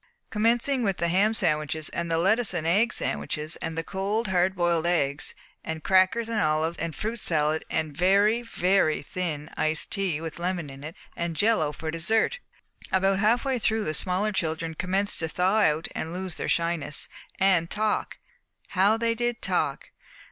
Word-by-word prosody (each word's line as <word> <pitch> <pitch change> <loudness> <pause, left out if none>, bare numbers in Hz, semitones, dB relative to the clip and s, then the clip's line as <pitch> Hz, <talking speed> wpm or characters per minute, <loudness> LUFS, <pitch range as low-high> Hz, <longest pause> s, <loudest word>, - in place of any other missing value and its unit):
Commencing 235 +5 +2
with 195 -5 0
the 170 - 0
ham 195 +5 +3
sandwiches 155 -6 0
and 170 0 -3
the 165 - +1
lettuce 195 +4 +2
and 160 -2 -2
egg 205 +8 +3
sandwiches, 155 +2 -2
and 160 0 -5
the 165 - -1
cold 200 +4 -2
hard 185 +1 +2
boiled 170 -2 +1
eggs, 145 -5 0 0.3
and 160 -1 -5
crackers 190 +5 +3
and 230 -2 -1
olives, 155 +2 0
and 165 -2 -3
fruit 225 +2 -3
salad, 155 -3 +1
and 155 -2 -2
very, 200 +7 +3
very 185 -9 +1
thin 155 -2 -4
iced 155 0 0
tea 190 -6 -1
with 160 0 -7
lemon 175 -4 -2
in 135 +1 -11
it, 155 +2 -7 0.2
and 170 -1 -3
jello 205 -7 +2
for 160 +2 -5
dessert! 220 - +1 0.5
About 195 +1 +2
half 230 +5 +2
way 265 -2 0
through 220 0 +1
the 155 - -2
smaller 185 +6 0
children 165 -3 -2
commenced 190 +4 0
to 160 - 0
thaw 185 +6 +1
out 155 -5 +2
and 160 - -4
lose 185 0 -4
their - - -4
shyness, 165 -3 0 0.3
and 185 -3 +3
talk. 215 0 -1 0.5
How 200 +3 +3
they 230 0 +1
did 240 0 -2
talk! - - -1
180 Hz, 175 wpm, -26 LUFS, 160-210 Hz, 0.5 s, ham